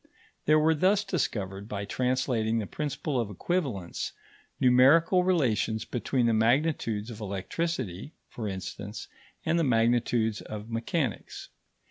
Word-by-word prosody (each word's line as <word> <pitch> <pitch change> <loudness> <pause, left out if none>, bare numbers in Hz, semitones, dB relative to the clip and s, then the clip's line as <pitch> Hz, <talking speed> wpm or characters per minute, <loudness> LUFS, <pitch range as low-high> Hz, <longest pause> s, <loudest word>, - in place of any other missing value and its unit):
There 155 +1 +6
were 155 +1 +4
thus 190 +6 +3
discovered, 105 - -3
by 100 -1 -3
translating 125 -1 0
the 110 - -1
principle 145 +1 -3
of 115 -4 -1
equivalence, 115 - -2 0.5
numerical 140 +9 +5
relations 120 - +1
between 125 0 0
the 115 - +3
magnitudes 115 -2 +1
of 110 -1 -9
electricity, 105 - -3
for 110 -3 -5
instance, 100 +2 -6 0.4
and 165 +2 +2
the - - +2
magnitudes 115 -3 +2
of 105 +1 -8
mechanics. 115 - -3
120 Hz, 120 wpm, -28 LUFS, 105-150 Hz, 0.5 s, There